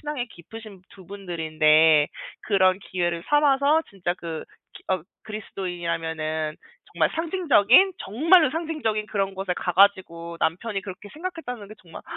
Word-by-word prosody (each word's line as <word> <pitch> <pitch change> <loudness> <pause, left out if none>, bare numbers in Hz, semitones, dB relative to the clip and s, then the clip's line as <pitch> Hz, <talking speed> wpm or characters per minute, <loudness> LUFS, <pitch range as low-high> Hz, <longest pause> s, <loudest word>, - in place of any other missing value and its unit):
신앙이 295 -5 -4
깊으신 205 +1 -12
두 190 -3 -16
분들인데 160 -5 +3 0.4
그런 190 -2 +3
기회를 175 -2 -1
삼아서 295 +1 +3
진짜 180 -3 -3
그 165 -3 -7 0.3
기 - - -13
어 185 - -1 0.2
그리스도인이라면은 165 -6 -4 0.4
정말 - - +1
상징적인 330 - +4
정말로 310 - +4
상징적인 300 -10 -2
그런 195 -2 -2
곳에 190 -1 -3
가 180 - -3
가지고 170 -3 +2
남편이 195 +5 -2
그렇게 195 +1 -9
생각했다는 310 - -6
게 215 - -11
정말 170 -3 -12
195 Hz, 335 characters per minute, -24 LUFS, 170-250 Hz, 0.4 s, 상징적인